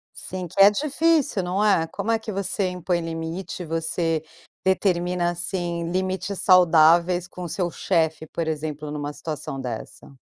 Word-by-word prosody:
Sim, 185 -1 -5
que 195 - -3
é 200 - +9
difícil, 295 - +1
não 185 +4 0
é. 190 -6 +3
Como 215 +7 -4
é 225 - +3
que 220 -1 -6
você 195 0 -1
impõe 180 -1 -1
limite, 165 +2 -5
você 165 0 -1 0.4
determina, 180 -2 +1
assim, 175 -1 -3
limites 190 +1 -2
saudáveis 175 0 +5
com 180 - -8
o 175 - -5
seu 175 +1 -1
chefe, 160 -4 0
por 165 +1 -4
exemplo, 150 -1 -4
numa 145 0 -4
situação 145 -3 -5
dessa? 125 +2 -7
175 Hz, 150 wpm, -24 LUFS, 160-190 Hz, 0.4 s, é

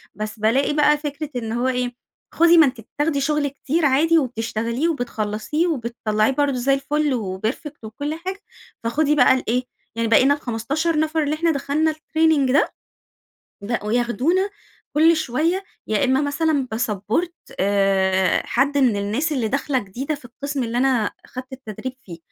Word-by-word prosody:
بس 215 +1 -5
بالاقي 255 +7 +2
بقى 300 0 +4
فكرة 295 0 -5
إن 225 -3 -3
هوّ 240 +3 0
إيه؟ 250 -1 -1 0.4
خدي 340 +1 +5
ما 320 - +8
أنتِ 255 -3 -3
بتاخدي 290 +5 -2
شغل 295 0 +1
كتير 290 +3 -1
عادي 310 +5 +4
وبتشتغليه 235 +1 -1
وبتخلصيه 245 +3 -2
وبتطلعيه 235 -5 0
برضو 285 0 +1
زي 260 +3 +2
الفُل 290 +1 0
و 190 -6 -3
perfect 290 +2 -6
وكل 285 +8 -4
حاجة، 375 +4 -5 0.4
فخدي 295 +5 +1
بقى 285 - +6
الإيه، 250 -1 0 0.3
يعني 230 0 0
بقينا 260 +5 +5
ال15 290 +5 -1
نفر 315 0 +1
اللي 295 +1 0
إحنا 335 +1 +1
دخلنا 300 +2 0
الtraining 310 -3 +1
ده، 280 - +2 0.9
بقوا 210 0 -3
ياخدونا 265 +11 +1 0.5
كل 325 +2 +6
شويّة 315 +7 0 0.2
يا 215 +4 +1
إما 265 +1 +2
مثلًا 285 -2 0
باsupport 225 - -1 0.3
آآ 190 -1 +2
حد 280 +3 +1
مِن 250 -6 +3
الناس 220 +11 -1
اللي 250 -6 0
داخلة 275 +2 0
جديدة 250 +8 -4
في 280 - -12
القسم 280 +3 -4
اللي 235 +1 -2
أنا 250 -5 +2
أخدت 255 0 -9
التدريب 255 0 -6
فيه، 170 -6 -10
270 Hz, 155 wpm, -22 LUFS, 230-300 Hz, 0.9 s, ما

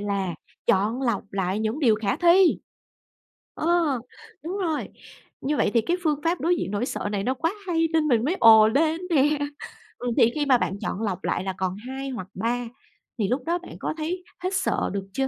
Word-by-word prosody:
là 195 -4 -2 0.3
chọn 215 +7 +2
lọc 235 -6 0
lại 190 0 -1
những 220 +6 -1
điều 235 -7 +5
khả 210 -2 -1
thi. 350 +1 +5 1.0
Ờ, 325 -5 +1 0.4
đúng 360 +5 -4
rồi. 330 -6 -1 0.5
Như 295 +2 -1
vậy - - +2
thì 230 - +5
cái 340 +11 0
phương 300 -3 +1
pháp 340 +2 +1
đối 345 +2 +2
diện - - -3
nỗi 210 +4 -1
sợ 205 - -3
này 200 - -1
nó 260 - +1
quá 330 +7 -1
hay 330 -2 +1
nên 315 -1 +2
mình 235 -3 +3
mới 340 +6 0
ồ 220 -1 +8
lên 315 +7 +1
nè. 295 -1 +3 0.6
Ừm, 245 0 -3
thì 230 - +5
khi 295 -1 0
mà 260 -3 +5
bạn 200 -3 -2
chọn 205 - -3
lọc 190 -4 -2
lại - - -1
là 190 -1 -3
còn 185 -1 -1
2 270 +1 -5
hoặc 225 -8 -6
3 235 +4 -1 0.5
thì 205 - +1
lúc 250 +4 -1
đó 340 +1 +1
bạn 355 - -11
có - - -2
thấy 350 +4 -3 0.2
hết 370 - +1
sợ 380 0 0
được 195 -1 -4
chưa? 270 +3 0
260 Hz, 210 wpm, -25 LUFS, 215-325 Hz, 1.0 s, ồ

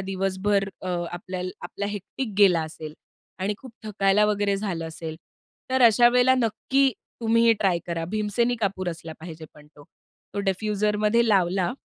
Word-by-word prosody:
दिवसभर 195 +1 0
अ, 185 - -5 0.2
आपल्याल 180 +1 -5
आपला 200 +3 -4
हेक्टिक 205 +4 -5
गेला 185 -5 +6
असेल 155 -1 -8 0.4
आणि 195 +3 -1
खूप 260 -3 -12
थकायला 205 0 +2
वगैरे 205 -1 +1
झालं 185 -5 -3
असेल. 160 0 -7 0.5
तर 260 0 +2
अशा 240 +1 +7
वेळेला 250 +1 +4
नक्की 260 +3 +1 0.3
तुम्ही 230 0 +3
हे 230 - +7
ट्राय 190 -4 +2
करा. 170 -1 -3
भीमसेनी 215 +4 0
कापूर 190 -2 -1
असला 165 -1 -6
पाहिजे 160 -1 -9
पण 150 0 -16
तो. 150 -1 -18 0.5
तो - - -3
डिफ्युजरमध्ये 210 +3 +1
लावला 190 0 +2
200 Hz, 150 wpm, -25 LUFS, 180-215 Hz, 0.5 s, अशा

